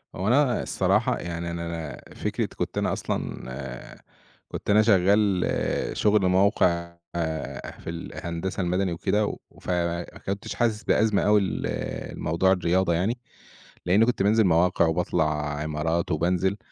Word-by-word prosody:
هو 95 +2 -2
أنا 130 +1 +3
الصراحة - - +1
يعني 85 0 -4
أنا 85 0 -4
أنا 80 -3 -7
فكرة - - -1
كنت - - -3
أنا - - +1
أصلًا 65 0 -5 0.5
كُنت - - -6
أنا 105 +1 +6
شغال 100 -2 +3 0.5
شُغل 105 -2 +3
موقع 90 -3 +2 0.2
آآ 80 -2 -4
في - - -7
ال 85 0 -6
الهندسة 85 +3 -4
المدني 90 +1 0
وكدا، 105 +5 +1 0.3
وف - - -12
ما 85 -1 0 0.2
كُنتِش 100 +3 -4
حاسِس 115 -3 0
بأزمة 105 -1 +2
أوي 105 0 +4
ل 95 - -2 0.5
لموضوع 85 +4 +1
الرياضة 90 0 +2
يعني، 95 +9 0 0.7
لإني 100 +6 +5
كنت 120 -5 0
بانزِل 110 +2 +4
مواقع 85 0 +3
وباطلَع 75 -3 0
عِمارات 80 +3 -1
وبانزِل، 90 +4 +1
90 Hz, 135 wpm, -26 LUFS, 85-100 Hz, 0.7 s, أنا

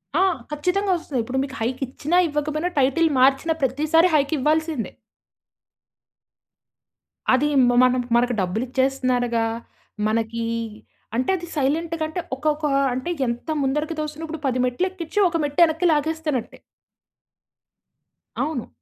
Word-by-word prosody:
ఆ! 355 - +3 0.3
ఖచ్చితంగా 365 +7 0
వస్తుంది. 285 -6 -4
ఇప్పుడు 260 +3 -2
మీకు 275 0 -7
హైకిచ్చిన, 260 +6 -3
ఇవ్వకపోయినా, 305 +3 -2
టైటిల్ 275 +5 +3
మార్చిన 270 +5 +4
ప్రతిసారి 310 +6 +3
హైకివ్వాల్సిందే. 305 -1 0 2.4
అది 280 +3 +3 0.2
మ - - +4
మనం 255 0 +3
మనకు 245 +1 +3
డబ్బులు 185 +6 -1
ఇచ్చేస్తున్నారుగా, 255 -3 +1 0.6
మనకి 230 +1 -1 0.7
అంటే 255 +2 0
అది 345 0 -8
సైలెంట్‌గా 320 +4 0
అంటే 345 +3 -4
ఒకొక్క, 300 +2 -1 0.3
అంటే 260 +7 -3 0.2
ఎంత 235 +6 -4
ముందరికి 300 +4 -1
తోసినప్పుడు 310 +1 -5
10 255 -1 0
మెట్లు 250 +10 0
ఎక్కించి 375 +2 -4
ఒక 335 - -1
మెట్టు 290 +2 -2
వెనక్కి 325 +2 -1
లాగేస్తునట్టే. 305 -4 -2 1.8
అవును. 300 -7 -2
290 Hz, 110 wpm, -23 LUFS, 255-320 Hz, 2.4 s, మార్చిన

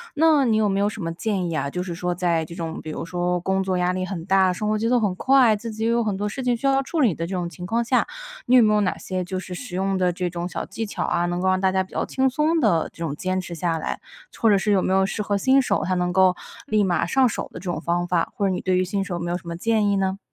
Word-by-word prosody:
那 305 -2 +4
你 225 -3 +2
有 215 -1 +2
没 195 0 0
有 205 - +2
什 210 -2 -5
么 165 - -2
建 185 0 -2
议 - - -3
啊？ 140 - -1
就 180 +5 -3
是 180 -2 -5
说 180 +1 -2
在 170 -3 0
这 170 - -10
种 165 -2 -5
比 155 - -8
如 - - -5
说 180 0 -1
工 190 +2 0
作 190 -1 -1
压 180 0 +1
力 185 0 -2
很 185 -3 -5
大， 190 -1 +3
生 210 +4 -2
活 215 - +1
节 225 +2 -1
奏 245 - +3
很 210 -5 +1
快， 255 -4 +4
自 230 +2 -6
己 220 +1 -4
也 225 - +2
有 235 0 +2
很 210 -3 -1
多 205 +2 -2
事 265 +6 -5
情 250 -1 +1
需 235 - -6
要 270 0 +3
处 310 +4 -2
理 230 -9 +4
的 165 +1 -4
这 190 - -4
种 175 -1 -2
情 175 +2 -9
况 230 +5 0
下， 250 +2 +1 0.4
你 250 - +4
有 250 - +8
没 215 -1 +4
有 210 - +3
哪 195 -3 0
些 185 -1 -4
就 185 +1 -4
是 185 0 -6
实 180 +1 -7
用 195 +1 0
的 180 -1 +1
这 180 0 -2
种 175 0 -4
小 - - -5
技 225 - -5
巧 205 - -4
啊， 175 - 0
能 175 0 -2
够 190 - +2
让 185 0 +2
大 190 0 +2
家 190 0 +1
比 185 - -17
较 - - -1
轻 265 0 +3
松 305 +5 +1
地 185 - +2
这 170 - -7
种 150 -3 -3
坚 185 +4 -2
持 175 -1 -7
下 165 0 -1
来？ - - -4 0.4
或 230 - +3
者 205 - +5
是 205 +2 0
有 195 -2 +3
没 190 - +1
有 190 - +4
适 205 +2 -3
合 205 0 -1
新 260 +6 +4
手， 255 - 0
他 185 - 0
能 180 0 0
够 185 -1 +4 0.3
立 215 -1 +2
马 180 -3 +1
上 260 +7 +3
手 230 - -4
的 - - -8
这 - - -14
种 160 - -4
方 175 +1 -1
法？ 175 -2 0
或 200 - 0
者 195 - +2
你 185 - -2
对 185 -1 +1
于 185 - +2
新 195 +2 -2
手 195 -2 -4
有 - - -3
没 175 0 -3
有 175 - 0
什 170 - -16
么 170 0 -5
建 215 +2 +1
议 200 - +2
呢？ 190 0 0
190 Hz, 350 characters per minute, -23 LUFS, 180-215 Hz, 0.4 s, 有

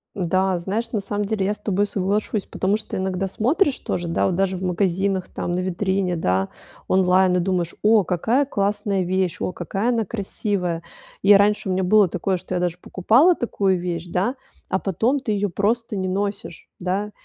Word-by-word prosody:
Да, 185 0 +1
знаешь, 215 +6 -3
на 210 - 0
самом 205 +1 -2
деле 200 -2 -1
я 205 - +1
с - - -11
тобой 205 0 0
соглашусь, 205 +1 -1
потому 195 +3 0
что 215 - -7
иногда 190 0 -1
смотришь 270 - +1
тоже 175 -1 -3
да 165 - +1
вот 185 - 0
даже 190 0 +1
в 185 - -6
магазинах 190 +1 0
там, - - -4
на 175 - 0
витрине, 185 0 -1
да, 95 - 0 0.4
онлайн 185 0 +4
и - - +3
думаешь: 175 -2 -1
"О, 215 -2 +5
какая 225 - +1
классная 205 -4 0
вещь, 185 0 -1
о - - -1
какая 195 +6 -2
она 230 -3 +1
красивая". 195 -4 -3 0.4
И 200 +2 +7
раньше 205 +1 +3
у 185 - 0
меня 190 +1 0
было 205 +2 +5
такое, 185 +2 -1
что 185 +1 -7
я 175 - 0
даже 175 -1 -1
покупала 250 - +4
такую 195 -7 0
вещь, 175 -1 -4
да, 185 +9 -1 0.3
а 190 - +1
потом 220 - 0
ты 250 -5 -2
ее 205 0 0
просто 215 +4 -1
не 190 -1 -1
носишь, 200 0 -4
да. 195 +3 -2
195 Hz, 190 wpm, -22 LUFS, 180-210 Hz, 0.4 s, И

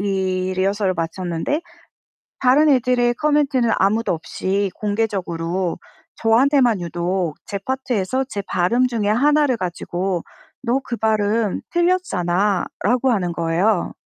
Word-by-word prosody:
이 190 -2 -1
리허설을 195 0 +1
마쳤는데 175 - -2 0.8
다른 275 +4 +4
애들의 245 -2 +2
코멘트는 280 -5 +1
아무도 215 +2 +1
없이 190 +4 -2
공개적으로 185 -5 -2 0.4
저한테만 240 -1 +3
유독 175 -1 -2
제 200 - -3
파트에서 255 +1 -1
제 200 -5 -4
발음 235 +9 +2
중에 220 -4 -1
하나를 285 +3 +3
가지고 180 -1 -3 0.4
"너 255 +2 +1
그 235 - -4
발음 215 -1 0
틀렸잖아."라고 240 - +1
하는 180 -5 0
거예요. 170 +4 0
205 Hz, 275 characters per minute, -21 LUFS, 185-250 Hz, 0.8 s, 다른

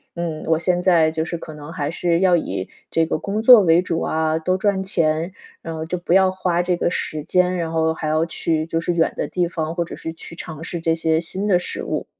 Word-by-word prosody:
“嗯， 165 -2 -4
我 160 0 +2
现 175 +1 +1
在 170 -4 +4
就 160 0 -1
是 170 0 -4
可 155 - -9
能 150 +1 -9
还 145 -5 -2
是 170 0 0
要 185 -1 +4
以 95 - -4 0.2
这 165 - +2
个 - - -1
工 205 +5 -2
作 235 -1 +9
为 170 -1 +4
主 170 -2 -2
啊， 160 0 0
多 185 +3 0
赚 195 -1 0
钱。 165 -2 0 0.3
然 165 - -6
后 160 0 -4
就 180 +3 -3
不 175 0 -1
要 190 0 +5
花 180 -2 0
这 180 0 +1
个 - - +1
时 155 -3 -3
间， 180 +2 +2
然 165 -2 -2
后 160 0 +1
还 160 - -5
要 155 +1 +2
去 160 -1 -1
就 165 0 -1
是 175 - -1
远 165 -1 +1
的 - - -1
地 180 -1 0
方， 160 -1 -3
或 170 -1 -1
者 - - -8
是 160 - -6
去 165 - -11
尝 160 -2 -8
试 170 +1 -4
这 165 -1 +1
些 160 -1 +1
新 190 +4 -1
的 190 -4 +4
食 175 - -5
物。” - - -3
165 Hz, 270 characters per minute, -21 LUFS, 160-180 Hz, 0.3 s, 作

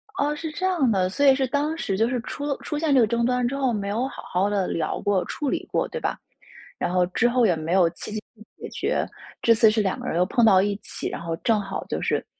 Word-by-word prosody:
哦， 290 +1 0
是 315 0 -5
这 370 +5 -3
样 335 -10 +2
的。 185 -2 +1
所 285 +9 0
以 270 -1 +7
是 265 -1 +1
当 295 +5 -1
时 195 -10 -2
就 225 +2 +3
是 250 -2 -1
出 285 +3 -6
了 280 -2 -1
出 300 - -3
现 305 -2 +1
这 260 - +6
个 - - +5
争 235 +1 0
端 250 0 +1
之 275 - -3
后 265 -3 +1
没 200 -1 -3
有 235 +6 -1
好 - - -9
好 190 +3 0
地 200 -3 0
聊 160 -2 -2
过、 200 -3 +1
处 290 -3 -3
理 - - -2
过， - - +1
对 485 - -4
吧？ - - -1 0.6
然 - - -2
后 180 -1 +3
之 230 +6 +2
后 245 -1 +3
也 175 -5 +3
没 160 +2 -3
有 180 -3 +5
积 - - -8
极 215 0 -4 0.4
解 - - -8
决， - - -1 0.4
这 230 - +5
次 220 -1 +5
是 215 0 +1
两 190 -2 -1
个 - - -6
人 165 - -1
又 180 - +3
碰 235 +5 +1
到 190 -3 +6
一 205 0 0
起， - - -6
然 - - -6
后 165 -1 -3
正 225 -3 +1
好 195 -1 -5
就 - - -3
是 - - 0
230 Hz, 300 characters per minute, -24 LUFS, 190-275 Hz, 0.6 s, 以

